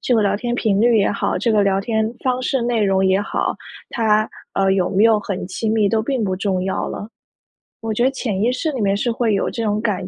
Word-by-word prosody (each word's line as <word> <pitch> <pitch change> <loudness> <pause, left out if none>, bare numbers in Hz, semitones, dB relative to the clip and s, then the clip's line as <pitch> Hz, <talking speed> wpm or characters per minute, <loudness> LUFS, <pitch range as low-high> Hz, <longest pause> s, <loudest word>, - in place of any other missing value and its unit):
这 250 - +1
个 220 - +3
聊 200 0 +1
天 240 +2 -3
频 210 -4 +1
率 235 0 +4
也 200 - +2
好， - - -1
这 230 - 0
个 210 -1 +3
聊 195 -1 +1
天 220 +2 -1
方 255 0 +1
式、 255 -1 0
内 235 -2 0
容 190 -1 +2
也 190 +1 +3
好， 205 - -2 0.4
它， 215 -2 +1 0.3
呃， 195 0 +2
有 185 -2 +1
没 200 +3 +3
有 225 -2 +5
很 195 -3 -4
亲 215 +3 -2
密 215 -2 +2
都 225 +1 +1
并 245 -2 -1
不 190 -1 -1
重 190 -2 -1
要 190 - -2
了。 205 - -6 0.7
我 225 -1 -3
觉 240 - 0
得 260 - +4
潜 220 -7 -3
意 235 - +2
识 300 +5 -2
里 255 -5 -4
面 200 0 +1
是 240 +3 0
会 230 -3 0
有 - - 0
这 230 - -4
种 210 -1 0
感 200 -4 -2
215 Hz, 275 characters per minute, -20 LUFS, 195-235 Hz, 0.7 s, 有